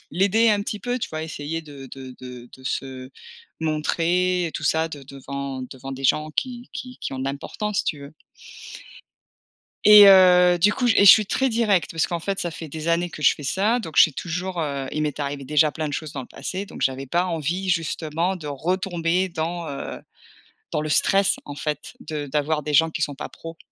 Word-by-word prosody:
l'aider 200 +7 +3
un 205 -1 +1
petit 210 0 -5
peu, 245 +1 -2
tu - - -4
vois? 155 0 -4
Essayer 160 +1 -5
de 140 -3 -11
de 130 0 -10
de 125 -1 -10
de 130 - -15
se 130 -1 -4 0.5
montrer 170 +3 0
et 160 - -6
tout - - -5
ça 160 +1 +1
de 145 -3 -9
devant 140 -1 -6
devant 130 +1 -8
des 135 +1 -8
gens 155 +4 +2
qui 245 - -4
qui 255 -1 -8
qui - - -5
ont 130 - -5
de - - -3
l'importance 195 +9 -3
si - - 0
tu 155 -5 -2
veux. 140 +2 -11 1.7
Et 210 -1 +10
heu, 180 -2 +7
du 205 +5 +4
coup 250 - -1
et 200 -2 +5
je - - +11
suis 215 -2 +6
très 265 +5 0
directe 220 -6 +1
parce 165 -1 0
qu'en 170 - -3
fait, 195 +3 -3
ça 175 - -2
fait 160 -1 -8
des 160 +3 -6
années 170 +1 +1
que 155 - -10
je - - +5
fais 145 - -11
ça 210 - +1
donc 160 -9 -8
j'ai 160 - +7
toujours, 180 +4 -4
heu, 140 -2 -3
il 155 - -1
m'est 150 -1 -3
arrivé 140 -1 -4
déjà 150 +2 +3
plein 155 -1 -3
de - - -6
choses 155 0 -5
dans 135 - -5
le - - -12
passé 190 +2 -5
donc - - -11
j'avais 135 +1 -1
pas 175 +6 0
envie 175 +3 -2
justement 165 +1 -1
de 155 -4 -9
retomber 175 +4 -1
dans, 170 0 -4
heu, 140 - -6 0.7
dans 150 - -1
le 155 - -4
stress 195 +6 +3
en 145 - -7
fait 150 0 -4
de 150 -2 -5
d'avoir 150 +2 0
des 150 0 -1
gens 160 +2 +4
qui 160 - -5
sont 145 -2 -1
pas - - -7
pro, 165 0 -10
160 Hz, 220 wpm, -23 LUFS, 145-185 Hz, 1.7 s, je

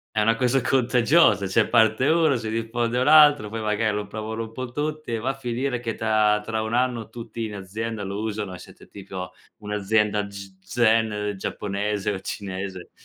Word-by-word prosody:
È - - +2
una 115 +2 +3
cosa 125 +2 +2
contagiosa, 125 - +3
cioè 110 +3 +2
parte 110 +4 +4
1, 160 -3 +3
si 110 -2 -3
diffonde 115 +2 -1
un 130 +3 +1
altro, 145 -7 +7
poi 110 0 -5
magari 105 0 0
lo 105 - -3
provano 110 +1 -5
un 110 0 -6
po' 130 +1 -6
tutti 150 -2 -3
e 115 - -1
va 130 +4 -2
a - - 0
finire 125 0 -2
che 115 -2 -3
ta 105 -1 +2
tra 110 0 -2
1 110 +1 -4
anno 120 -2 0
tutti 115 -1 -6
in 105 - -6
azienda 105 +3 -5
lo 100 +1 -4
usano, 105 -4 -4
e - - -8
siete - - -15
tipo 95 -2 -8 0.3
un'azienda 105 0 0
g 100 -1 -10
zen 110 0 +1
giapponese 105 +1 -2
o 95 - -4
cinese 95 -2 -6
110 Hz, 190 wpm, -24 LUFS, 105-120 Hz, 0.3 s, altro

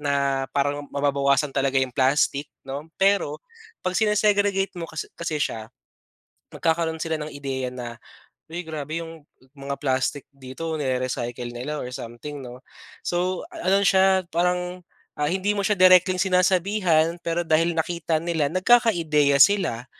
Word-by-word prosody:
na 140 -2 0
parang 145 +1 0
mababawasan 140 0 +2
talaga 135 0 0
yung 130 - -1
plastic 140 +2 +2 0.2
'no, 140 +3 -6
pero 195 -6 +1 0.4
'pag 185 - -2
sine-segregate 205 -2 +2
mo 165 - -4
kas 160 - -5
kasi 165 -2 -2
siya, 110 -1 -3 0.9
magkakaroon 160 -1 0
sila 160 0 -1
ng 150 0 -6
ideya 135 -2 -4
na, 120 -2 -7 0.6
"Uy, 175 +2 -4
grabe 155 0 -5
yung 165 -2 -11 0.3
mga 140 0 -4
plastic 130 0 -1
dito 140 +4 -6
nire-recycle 125 -3 -2
nila, 130 +6 -5
or 125 - -6
something 125 +3 -7
'no." 125 +1 -10 0.4
So, 180 +1 -1
ano 200 - +1
siya 190 -1 +4
parang, 180 +1 -1 0.4
ah, 150 - +1
hindi 190 +2 0
mo 200 - +1
siya 210 - +2
directly 185 0 +6
sinasabihan, 180 -2 +2
pero 170 +1 -1
dahil 165 +1 +2
nakita 165 -1 -1
nila 165 -3 0
nagkaka-ideya 170 - +4
sila 175 - +2
160 Hz, 140 wpm, -24 LUFS, 140-180 Hz, 0.9 s, directly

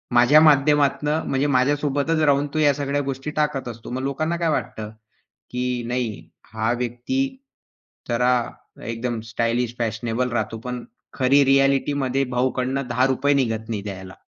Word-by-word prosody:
माझ्या 125 +6 +7
माध्यमातनं 150 0 +3
म्हणजे 135 +2 +1
माझ्यासोबतच 145 +3 +1
राहून 145 -1 +3
तो 155 - 0
या 145 -2 +4
सगळ्या 145 0 -1
गोष्टी 135 +3 -6
टाकत 150 -4 0
असतो. 115 -1 -9
मग 130 +1 -3
लोकांना 155 +5 -1
काय 170 -1 0
वाटतं, 110 -7 -3 0.6
की 125 -1 -2
नाही 120 -3 -3 0.2
हा 110 +1 0
व्यक्ती 120 - -3 0.9
जरा 125 +1 +3 0.5
एकदम 115 0 -3
स्टायलिश 115 +1 -1
फॅशनेबल 115 +2 -1
राहतो 110 -1 -2
पण 125 +1 -5 0.3
खरी 135 +2 +4
रिॲलिटीमध्ये 135 0 +2
भाऊकडंन 130 +1 0
₹10 130 +3 +2
निघत 110 -4 -1
नाही 110 -3 -2
द्यायला. 95 -2 -7
130 Hz, 135 wpm, -23 LUFS, 120-145 Hz, 0.9 s, माझ्या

